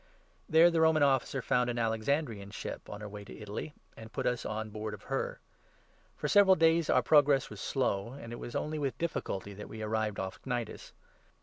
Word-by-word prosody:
There 165 +2 +7
the 165 -1 +2
Roman 160 -2 +5
Officer 135 -1 +2
6 - - -20
found 125 0 +2
an 120 - -2
Alexandrian 115 -1 -1
ship - - -7
on 105 0 -7
her 105 - -5
way 105 0 -8
to - - -11
Italy, 105 +8 -6 0.2
and 110 0 -11
put - - -3
us 125 -1 0
on 110 0 -4
board 105 0 -4
of - - -17
her. - - -3 0.8
For - - -2
several 200 -2 +6
days 165 0 +3
our - - +4
progress 145 -4 +4
was 105 -2 -8
slow, 120 -4 -1
and 120 -4 -8
it - - -5
7 - - -10
was 120 - -7
only 155 0 -2
with 135 -4 -2
difficulty 100 - -3
that 105 +1 -9
we 110 0 -6
arrived 110 -1 -1
off 95 0 -5
Cnidus. 120 -4 -4
120 Hz, 210 wpm, -31 LUFS, 105-150 Hz, 0.8 s, There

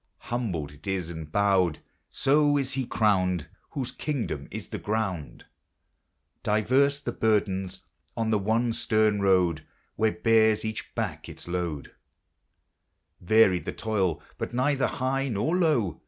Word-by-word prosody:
Humbled 90 - -2
it 75 +6 -15
is 90 -3 -2
and 80 -2 -8
bowed; 95 -5 +2 0.5
bo 145 +1 +4
is 135 -1 0
be 130 -2 -2
crowned 90 -6 +1 0.3
Whose 135 -5 -3
kingdom 145 -6 -3
is - - -7
the - - -5
ground. 100 -8 -3 1.0
Diverse 130 +7 +2
the 130 -5 -4
burdens 95 -4 0 0.3
on 115 -1 0
the 105 - +3
one 115 +4 +1
stern 110 -2 +2
road 90 -5 +3 0.3
Where 110 0 +3
bears 110 +4 +3
cadi 110 -1 -2 0.2
back - - -3
its - - -9
load; 85 -5 -3 1.3
Varied 95 -2 +4
the - - -3
toil, 100 -7 -1 0.2
but 120 - -4
neither 135 +2 +2
high 135 +1 -1
nor 120 - 0
low. 145 - +1
110 Hz, 135 wpm, -27 LUFS, 90-125 Hz, 1.3 s, bo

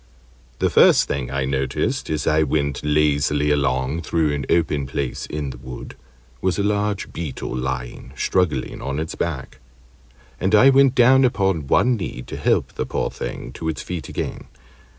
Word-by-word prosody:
The - - +1
first - - +6
thing 65 -3 -3
I 70 0 -1
noticed, 65 -1 -1
as 75 -1 -1
I 80 0 +3
went 70 -1 0
lazily 75 -1 +2
along 70 +2 0
through 80 -2 0
an 70 -2 -3
open 75 -5 +1
place 65 -1 -3
in 75 -2 -4
the - - -11
wood, 65 -1 -9 0.5
was 95 -1 0
a 100 - 0
large 105 -1 -1
Beetle 75 -6 -5
lying 65 -1 -4
struggling 85 -9 0
on 70 0 -3
its 80 +1 -4
back, 65 -5 -4 0.8
and 95 +4 +2
I 130 +6 +7
went 135 -1 +5
down 130 +2 +6
upon 95 - +1
one 125 - +3
knee 65 - -5
to - - -8
help - - 0
the - - -3
poor - - -2
thing - - -6
to 80 +4 -4
its 75 - -4
feet 90 -3 -5
again. - - -4
75 Hz, 170 wpm, -22 LUFS, 70-90 Hz, 0.8 s, I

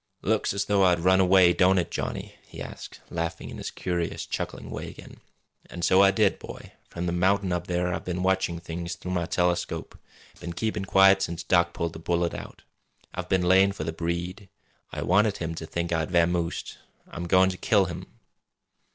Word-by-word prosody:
"Looks - - +1
as 100 +1 -1
though 100 -1 +2
I'd 90 -2 +3
run 95 +2 +4
away, 95 -1 +6
don't 95 +1 +4
it, 90 - 0
Johnny?" - - -4
he - - -11
asked, - - -9
laughing 85 0 -4
in - - -8
his - - -4
curious, 85 -2 -3
chuckling - - -5
way - - -5
again. - - -13 0.5
"An' 85 - -7
so 95 +3 +5
I 100 - +7
did, 95 - +2
boy. - - -10 0.2
From 85 +1 -5
the 85 - 0
mountain 95 +2 +1
up 90 0 -3
there 90 0 0
I've - - -4
been 90 0 -3
watching 95 -2 +1
things 85 +2 -5
through 90 - -7
my 85 -2 -1
telescope 90 0 -1 0.4
been 85 - -6
keepin' 105 +1 -2
quiet 95 0 +5
since 85 0 -3
Doc 85 -1 +2
pulled 85 -1 -3
the - - -8
bullet 85 +1 0
out. - - -9 0.5
I've - - -5
been 95 -1 +2
layin' 95 +2 +5
for 100 - -5
the 80 +1 -3
Breed. 85 +4 -4 0.4
I - - -4
wanted 100 +3 +3
him 80 -1 -3
to 80 -1 -7
think 85 +1 -2
I'd 80 -1 -1
vamoosed. 85 -1 0 0.3
I'm 85 0 -6
goin' 95 +2 +4
to 90 - -7
kill 100 -1 +3
him!" 85 - -7
90 Hz, 195 wpm, -26 LUFS, 85-95 Hz, 0.5 s, I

